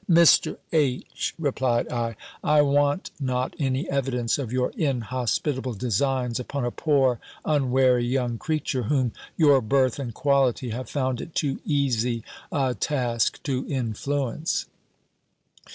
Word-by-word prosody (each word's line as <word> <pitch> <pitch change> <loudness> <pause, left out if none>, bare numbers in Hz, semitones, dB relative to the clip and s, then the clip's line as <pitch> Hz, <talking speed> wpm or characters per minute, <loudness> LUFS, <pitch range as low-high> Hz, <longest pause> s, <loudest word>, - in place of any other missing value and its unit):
"Mr. 170 -1 +5
H.," 140 -6 0
replied 130 -6 0
I, 115 -2 -2 0.3
"I 150 -1 +5
want 145 +3 +1
not 130 -2 -1
any 135 -1 0
evidence 130 -3 0
of 125 -5 -4
your 125 0 0
inhospitable 130 -1 -1
designs 125 +2 0
upon 125 +1 -3
a 120 - -1
poor 135 -6 +2 0.3
unwary 130 -4 +3
young 120 -2 -1
creature, 150 -4 -1
whom 125 +1 +1 0.3
your 145 -5 +5
birth 130 +3 +2
and 125 -4 -4
quality 135 -1 +1
have 125 +3 -5
found 130 -4 -1
it 160 - -9
too 140 -3 0
easy 125 -6 0 0.3
a 135 -3 +1
task 120 0 -1
to 135 -2 -1
influence." 135 +3 -1
130 Hz, 125 wpm, -25 LUFS, 120-140 Hz, 0.3 s, Mr